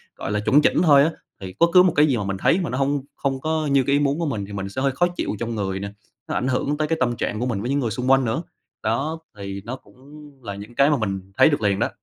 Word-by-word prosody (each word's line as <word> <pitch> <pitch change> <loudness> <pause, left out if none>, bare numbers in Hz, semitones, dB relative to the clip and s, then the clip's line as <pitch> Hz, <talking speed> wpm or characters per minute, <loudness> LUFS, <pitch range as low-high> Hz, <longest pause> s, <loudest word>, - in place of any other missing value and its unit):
gọi - - -5
là 105 - 0
chuẩn 140 +8 +4
chỉnh - - +3
thôi 145 -4 +6
á, 165 - +1 0.3
thì 95 -1 -7
bất 170 - +6
cứ 180 0 +8
một 180 - +2
cái 150 +1 +6
gì 130 -5 +1
mà 105 - -2
mình 95 0 -3
thấy 170 - +2
mà 170 - -3
nó 125 - -3
hông, 140 0 0
không 135 -1 -2
có 155 0 -1
như 135 -1 +4
cái 140 - 0
ý 145 - +4
muốn 145 +2 0
của 170 - -1
mình 110 -9 -3
thì 100 - -10
mình 95 -1 -4
sẽ 130 +7 -4
hơi 140 - +2
khó 175 +7 +2
chịu - - -2
trong 115 -1 -3
người 95 -2 -2
nè. 100 0 -5 0.4
Nó - - -3
ảnh 125 - -1
hưởng 140 +3 0
tới 155 0 0
cái 165 - 0
tâm 120 -2 +1
trạng 105 - -3
của 125 - -1
mình 110 -6 -2
với 120 - -3
những 140 +1 +1
người 120 -4 -1
xung 125 +4 0
quanh 135 -1 +4
nữa. 115 +8 -1 0.4
Đó, 140 +9 -1 0.2
thì 100 0 -6
nó 125 - -4
cũng 130 - -19 0.5
là 100 -2 -5
những 105 +4 -10
cái 140 +4 +4
mà 150 - +2
mình 95 -4 -4
thấy - - +7
được 145 - -1
liền 100 -2 +1
đó. - - +1
130 Hz, 315 wpm, -22 LUFS, 105-145 Hz, 0.5 s, cứ